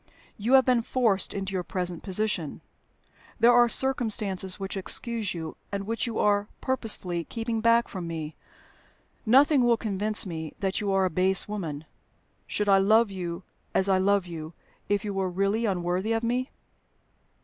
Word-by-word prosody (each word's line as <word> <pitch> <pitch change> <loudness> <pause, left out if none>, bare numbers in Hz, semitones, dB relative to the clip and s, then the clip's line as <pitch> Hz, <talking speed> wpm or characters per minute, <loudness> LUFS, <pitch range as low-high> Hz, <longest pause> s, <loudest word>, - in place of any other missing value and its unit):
"You 225 +5 -1
have 265 -1 +7
been 250 -2 +3
forced 225 -5 0
into 195 -1 -4
your 185 - -1
present 180 -1 -4
position: 190 -5 -3 0.8
there 235 +1 +6
are 240 0 +5
circumstances 215 -8 +1
which 195 0 -4
excuse 210 +1 0
you, 160 -2 -6
and 200 -1 -3
which 230 +3 -1
you 230 - -4
are 205 0 +2
purposely 210 -9 -1
keeping 225 -1 -3
back 230 +1 +3
from 180 -4 -6
me. 160 -2 -5 0.9
Nothing 275 +3 +5
will 240 -1 +3
convince 210 0 0
me 160 -4 -6
that 195 0 -1
you 200 -1 -1
are 195 -1 +2
a 185 - -1
base 185 +2 +2
woman. 165 -8 -5 0.6
Should 210 - -1
I 195 -1 +5
love 215 +2 +4
you 175 -1 -5 0.3
as 190 - +2
I 190 -1 +3
love 200 0 +2
you, 165 -2 -8 0.4
if 205 0 0
you 205 - -3
were 190 -1 -1
really 200 +5 0
unworthy 185 +3 -1
of 225 +1 -1
me?" 250 +3 -1
200 Hz, 165 wpm, -26 LUFS, 185-225 Hz, 0.9 s, have